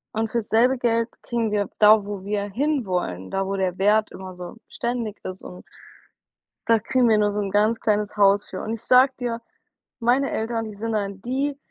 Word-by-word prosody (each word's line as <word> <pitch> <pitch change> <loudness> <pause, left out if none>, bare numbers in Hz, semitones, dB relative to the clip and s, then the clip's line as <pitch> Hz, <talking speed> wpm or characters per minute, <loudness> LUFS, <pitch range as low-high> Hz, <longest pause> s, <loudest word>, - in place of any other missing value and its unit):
Und 220 0 -1
fürs 235 -3 -2
selbe 245 +4 +3
Geld 230 -1 +1
kriegen 230 -2 -1
wir 205 -1 0
da, 210 -1 +6
wo 200 -2 -6
wir 200 0 -2
hinwollen, 195 - -2
da 195 0 -1
wo 195 +1 -2
der 185 -1 -1
Wert 210 +2 +2
immer 185 -1 -9
so 180 +4 -8
beständig 235 -3 -3
ist 185 0 -7
und 180 - -9 1.1
da 230 -1 +4
kriegen 250 +3 +1
wir 215 - +4
nur 205 0 +2
so 205 - -3
'n 195 -1 -3
ganz 215 +2 +2
kleines 210 -1 -1
Haus 200 0 +4
für 185 - -6
und 220 - -4
ich 230 - -6
sage 255 +2 +5
dir, 235 -2 -3 0.6
meine 250 +4 +2
Eltern, 225 0 -2
die 215 -1 -8
sind 225 +2 -3
dann 200 -2 -3
die, 275 +4 -2
215 Hz, 200 wpm, -23 LUFS, 200-235 Hz, 1.1 s, da